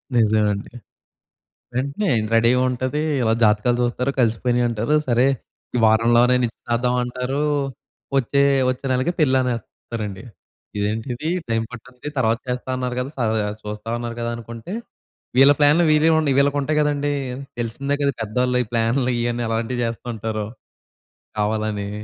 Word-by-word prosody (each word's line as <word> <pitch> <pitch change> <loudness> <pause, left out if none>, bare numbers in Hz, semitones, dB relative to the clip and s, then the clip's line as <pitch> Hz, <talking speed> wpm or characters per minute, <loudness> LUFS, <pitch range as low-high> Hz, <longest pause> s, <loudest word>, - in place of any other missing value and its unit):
నిజమే 110 -2 +4
అండి. 100 +4 -7 1.0
వెంటనే 140 +11 -1 0.3
రెడీగుంటది 125 +4 +2 0.2
ఇలా 110 -1 +2
జాతకాలు 105 +3 +3
జూస్తారు, 125 +2 0
కలిసిపోయినియంటారు 120 +2 +1
సరే 120 +2 +4 0.5
ఈ - - +2
వారంలోనే 120 +3 +4
నిచ్చి‌తర్దమంటారు 125 +3 -1 0.7
వచ్చే 140 +2 +2 0.3
వచ్చే 130 +1 -2
నెలకి 130 +7 +1
పెళ్ళి 135 -3 +4
అనేస్తారండి. 110 -4 -5 0.5
ఇదేంటిది 115 +8 -2 0.2
టైం 115 0 +1
పట్టానికి 125 +3 -9
తర్వాత 115 -2 +2
చేస్తా 125 +1 -3
అన్నారు 125 -1 -3
గదా! 130 +2 -3
స - - -14 0.2
ద 110 - +1 0.2
చూస్తా 105 +1 -7
అన్నారు 120 -1 -5
గదా 115 - -2
అనుకుంటే, 115 - -8 0.7
వీళ్ళ 135 +2 +8
ప్లాన్లు 150 +4 +5
వీరివండి 155 -1 +4
వీళ్ళకుంటాయి 145 +2 +2
గదండీ! 145 -1 +1 0.5
తెలిసిందే 140 +5 -2
కదా! 140 -1 +1
పెదోళ్ళు 125 +3 0
ఈ - - -16
ప్లాన్లు 120 +2 +1
ఇయన్నీ 120 0 -1
ఎలాంటివి 115 +2 -1
జేస్తూ 115 +1 -4
ఉంటారో. 110 -1 -3 0.9
కావాలని 105 -1 -1
120 Hz, 125 wpm, -22 LUFS, 115-130 Hz, 1.0 s, వీళ్ళ